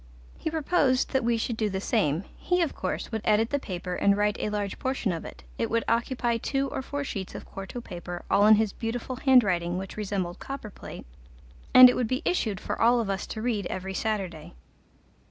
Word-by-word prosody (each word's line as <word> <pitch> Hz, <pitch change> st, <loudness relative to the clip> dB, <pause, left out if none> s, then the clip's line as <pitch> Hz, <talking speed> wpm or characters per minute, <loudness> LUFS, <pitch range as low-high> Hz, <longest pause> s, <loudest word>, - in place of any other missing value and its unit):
He -, -, -2 dB
proposed 300 Hz, -4 st, +1 dB
that 265 Hz, -, +1 dB
we 235 Hz, 0 st, +2 dB
should 225 Hz, 0 st, -2 dB
do 215 Hz, -2 st, 0 dB
the 190 Hz, -1 st, -2 dB
same; 190 Hz, -, +1 dB
he, 360 Hz, 0 st, +1 dB
of 320 Hz, -, -2 dB
course, -, -, -4 dB
would 220 Hz, -1 st, -2 dB
edit 220 Hz, +1 st, +2 dB
the 285 Hz, -, +1 dB
paper 180 Hz, -6 st, -5 dB
and 200 Hz, +2 st, +3 dB
write 210 Hz, 0 st, +2 dB
a -, -, -1 dB
large 205 Hz, -2 st, -3 dB
portion 260 Hz, -6 st, -1 dB
of 165 Hz, -2 st, -4 dB
it; 65 Hz, -, -10 dB, 0.2 s
it -, -, 0 dB
would 230 Hz, 0 st, +1 dB
occupy 235 Hz, 0 st, +1 dB
two 275 Hz, +3 st, -1 dB
or -, -, -3 dB
four 285 Hz, +2 st, -4 dB
sheets 195 Hz, -8 st, -5 dB
of -, -, -7 dB
quarto 195 Hz, +5 st, -7 dB
paper, 175 Hz, -4 st, -7 dB
all 205 Hz, +1 st, +4 dB
in 215 Hz, -, +9 dB
his 215 Hz, -1 st, 0 dB
beautiful 245 Hz, +2 st, -4 dB
handwriting, 190 Hz, -11 st, +3 dB
which 190 Hz, +2 st, -6 dB
resembled 195 Hz, -4 st, -3 dB
copper 270 Hz, -6 st, -7 dB
plate, -, -, -10 dB, 0.7 s
and 255 Hz, 0 st, +11 dB
it 250 Hz, -, +2 dB
would 245 Hz, -, 0 dB
be 255 Hz, +4 st, -2 dB
issued 220 Hz, -, 0 dB
for -, -, -4 dB
all 240 Hz, +1 st, +5 dB
of 215 Hz, -4 st, -1 dB
us 195 Hz, -, -3 dB
to 220 Hz, -, -5 dB
read 215 Hz, -6 st, -1 dB
every 190 Hz, +1 st, -4 dB
Saturday. 185 Hz, -6 st, -3 dB
220 Hz, 210 wpm, -27 LUFS, 195-250 Hz, 0.7 s, and